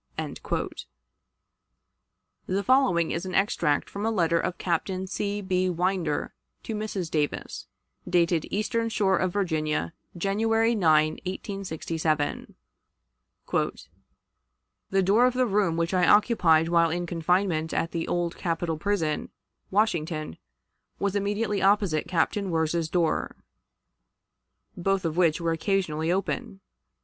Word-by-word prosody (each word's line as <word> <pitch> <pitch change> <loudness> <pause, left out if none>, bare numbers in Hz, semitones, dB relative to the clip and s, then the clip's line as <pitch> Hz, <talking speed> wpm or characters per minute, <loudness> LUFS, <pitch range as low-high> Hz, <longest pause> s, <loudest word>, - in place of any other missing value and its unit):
The 195 +2 0
following 250 -11 +3
is 170 +3 -3
an 185 - -4
extract 170 -7 +1
from 200 - -6
a 225 - +1
letter 170 -6 +2
of 180 - -2
Captain 185 +2 -1
C. 200 +2 -3
B. 185 -1 0
Winder 180 -3 -1 0.3
to 225 - -4
Mrs. 210 -5 -3
Davis, 150 -2 -2 0.4
dated 170 -2 +2
Eastern 230 +2 -1
Shore 200 -4 +2
of 185 -1 0
Virginia, 155 - -1 0.2
January 225 +5 +2
9, 155 -6 +3
1867: 165 -6 -3 2.3
"The 195 0 +2
door 215 +7 +5
of 250 - -1
the 255 0 +3
room 195 -6 +1
which 170 +2 0
I 180 -1 +3
occupied 180 -7 +4
while 170 -1 +4
in 175 +2 -2
confinement 170 -1 0
at 165 - -1
the 165 -1 -3
Old 175 -1 -1
Capitol 165 -2 -2
Prison, 170 -7 -1 0.4
Washington, 165 - 0 0.6
was 200 0 -1
immediately 205 0 0
opposite 195 -6 +2
Captain 185 +3 0
Wirz's 160 0 0
door 170 -2 0 1.4
both 195 0 0
of 160 -1 -1
which 170 -3 +3
were 170 -1 0
occasionally 165 -2 0
open. 195 +1 -2
180 Hz, 120 wpm, -26 LUFS, 165-200 Hz, 2.3 s, door